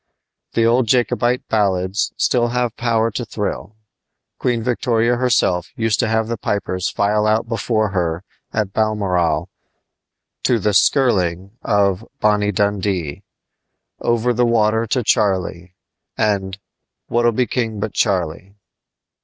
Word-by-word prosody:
The 115 - +2
old 120 +1 +3
Jacobite 125 +1 +1
ballads 95 -1 0
still 120 -2 +2
have 120 -1 -1
power 115 -1 +1
to 120 - -3
thrill. 105 0 -4 0.6
Queen 120 -2 0
Victoria 120 -1 +1
herself 110 -8 +1
used 115 -1 0
to 120 - +2
have 110 0 0
the 115 -2 -4
pipers 95 -3 -2
file 105 +1 +1
out 110 +1 +1
before 110 -1 0
her 85 -3 -2 0.3
at 105 -3 -2
Balmoral 90 -6 0 0.9
to 125 - +2
the 105 -2 0
"skirling" 95 - +2
of 100 0 +1 0.2
"Bonnie 105 -1 +2
Dundee," 95 -6 -1 0.8
"Over 120 +1 +1
the 120 +1 +1
Water 115 -1 +2
to 125 +3 0
Charlie," 95 -5 0 0.4
and 100 -3 0 0.5
"Wha'll 120 0 +2
Be 125 +3 +1
King 115 -4 -2
but 110 +1 -3
Charlie!" 95 0 -1
110 Hz, 125 wpm, -19 LUFS, 95-115 Hz, 0.9 s, old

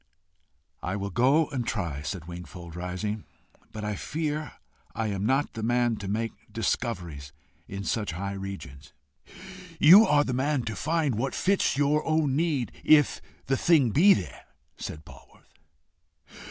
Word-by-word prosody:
"I 90 - -3
will 100 0 -4
go 135 - +4
and 130 -4 -2
try," 90 -11 -3
said 85 +2 -5
Wingfold, 85 -1 -9
rising; 90 +4 -4 0.5
"but 110 -1 -7
I 105 - -1
fear 150 - -3 0.4
I 115 -2 -1
am 100 +1 -2
not 135 +3 +1
the 110 - -5
man 120 0 +1
to 100 - -6
make 110 +3 -1 0.2
discoveries 90 - -3 0.4
in 100 0 -6
such 105 -5 -2
high 100 +3 -4
regions." 95 -8 -8 0.9
"You 190 +9 +9
are 145 0 +4
the 130 - -3
man 135 +1 0
to 110 -2 -4
find 155 - 0
what 135 +2 -2
fits 190 -8 +1
your 145 +2 +2
own 155 -4 +1
need 145 - 0
if 150 -2 +4 0.2
the 135 - +1
thing 145 -8 +4
be 190 - +6
there," 85 -9 -7 0.3
said 75 0 -7
Polwarth. 75 -6 -17
115 Hz, 150 wpm, -27 LUFS, 95-145 Hz, 0.9 s, You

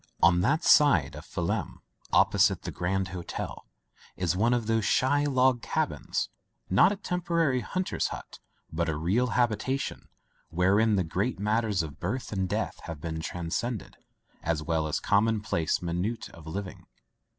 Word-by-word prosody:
On 90 0 +6
that 150 - +2
side 90 - +5
of - - -9
Phelim - - -2 0.3
opposite - - +4
the - - -4
Grand 95 +2 -1
Hotel 90 -1 -6 0.5
is 90 -1 0
one 110 +6 +2
of 120 -2 +1
those 115 0 +1
shy 145 +6 +2
log 130 -3 +3
cabins; - - -2 0.4
not 95 - +6
a - - -1
temporary 170 -8 0
hunter's 185 +7 -1
hut, - - -8 0.3
but 85 +1 0
a 80 - -1
real 95 +11 +1
habitation 125 +3 -1 0.4
wherein 100 +6 +3
the 95 - +2
great 95 +9 -1
matters 105 -2 +1
of 75 -2 -8
birth 110 +9 -3
and 95 -3 -1
death - - -2
have 80 -3 -6
been 80 +1 -4
transacted, 90 +8 -3 0.5
as 80 -2 -1
well 80 -1 0
as 75 - -1
common 110 +2 +2
place 85 -6 -1
minutiae 90 +7 -3
of 80 -1 -13
living. 95 +3 -6
100 Hz, 150 wpm, -28 LUFS, 85-125 Hz, 0.5 s, On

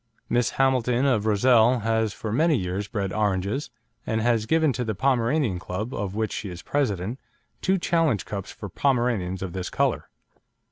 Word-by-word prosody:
Miss 120 0 +2
Hamilton 130 -1 +2
of 115 -6 +2
Rozelle 115 +3 +4
has 110 0 +1
for 110 0 -5
many 155 +5 +3
years 95 +1 -3
bred 100 -3 -3
"oranges," 105 +5 -1 0.3
and 110 - -1
has 115 -1 +1
given 160 0 +3
to 125 - -2
the 110 -3 -2
Pomeranian 125 - +1
Club, 105 +8 -5
of 100 -3 -3
which 110 -1 -1
she 100 - -4
is 90 -1 -8
President, 115 -4 -1 0.4
two 190 +1 +2
challenge 165 - +1
cups 100 -2 -5
for - - -8
Pomeranians 120 -9 0
of 90 -3 -5
this 90 -1 -4
colour. - - 0
110 Hz, 170 wpm, -25 LUFS, 100-130 Hz, 0.4 s, Rozelle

